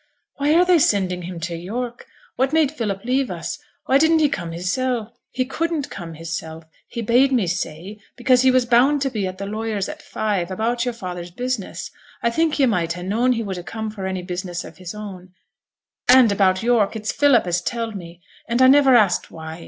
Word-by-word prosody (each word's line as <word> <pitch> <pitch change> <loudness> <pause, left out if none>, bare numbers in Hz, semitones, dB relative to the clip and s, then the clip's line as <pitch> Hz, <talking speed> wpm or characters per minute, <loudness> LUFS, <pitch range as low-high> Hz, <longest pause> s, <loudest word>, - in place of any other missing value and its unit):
'Why 290 +2 +2
are 355 +2 +5
they 360 -2 +5
sending 190 - +1
him 175 0 -6
to 170 +1 -3
York? 235 +8 -5 0.3
What 265 +3 0
made 315 -3 +3
Philip 215 -7 -4
leave 260 +1 +1
us? 180 - -5 0.3
Why 270 - +4
didn't 320 +2 +4
he 305 -2 +3
come 175 -7 -4
hissel'?' 230 +6 -2 0.2
'He 255 0 -1
couldn't 320 +2 -2
come 165 -3 -7
hissel', 165 0 -6 0.2
he 235 - -5
bade 250 +5 +4
me 240 -7 +2
say; 180 +3 -4 0.2
because 250 0 +3
he 260 - +5
was 255 -1 +3
bound 265 +4 +4
to 270 - -1
be 210 -5 -2
at 185 0 -6
the 200 - -5
lawyer's 215 -1 -3
at - - -8
five, 205 -5 -2
about 230 +5 -1
yo'r 245 - -1
father's 180 -5 -6
business. 245 +2 -4 0.3
I 235 - +2
think 320 +4 +1
yo' 280 - +4
might 175 -8 0
ha' 175 +1 -7
known 230 +7 +2
he 230 -1 -2
would 195 -3 -4
ha' - - -8
come 220 +3 -5
for 195 -3 -5
any 185 -1 -3
business 180 -1 -4
of - - -12
his 185 +1 -8
own; 185 -3 -9 0.7
and, 250 -3 +7
about 190 0 +2
York, 230 -3 +2
it's 215 -1 -2
Philip 280 -7 +4
as 175 0 0
telled 230 -2 -3
me, 175 -2 -10 0.3
and 235 +1 +1
I - - +8
never 270 -1 +6
asked 205 -6 +3
why. 160 0 -8
215 Hz, 210 wpm, -21 LUFS, 180-255 Hz, 0.7 s, I